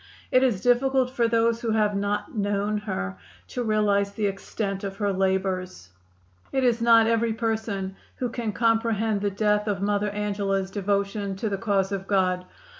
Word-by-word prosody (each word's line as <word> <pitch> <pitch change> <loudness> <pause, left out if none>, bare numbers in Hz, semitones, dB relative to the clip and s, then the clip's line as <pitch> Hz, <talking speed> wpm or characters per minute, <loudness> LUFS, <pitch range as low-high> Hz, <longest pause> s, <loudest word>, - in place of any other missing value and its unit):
It 255 - +5
is 240 -8 +2
difficult 255 +2 +2
for 240 -3 +1
those 230 0 +2
who 230 - -2
have 210 -2 +2
not 205 +7 -2
known 205 0 0
her 95 - -4 0.3
to 250 - -3
realize 210 -3 +2
the 215 - -1
extent 195 0 -3
of 195 -1 -4
her 205 -1 0
labors. 185 - -1 0.6
It 265 -1 0
is 240 -2 +2
not 230 -1 +6
every 230 0 +2
person 220 -4 -2 0.2
who 250 - -2
can 230 -2 -3
comprehend 225 -2 +1
the 205 - +1
depth 210 +1 +1
of 200 -2 0
Mother 205 0 +1
Angela's 200 -2 -1
devotion 200 0 -1
to 215 +3 -2
the 200 - -2
cause 200 -3 +1
of 195 -1 -4
God. 185 -2 +1
205 Hz, 170 wpm, -25 LUFS, 195-225 Hz, 0.6 s, not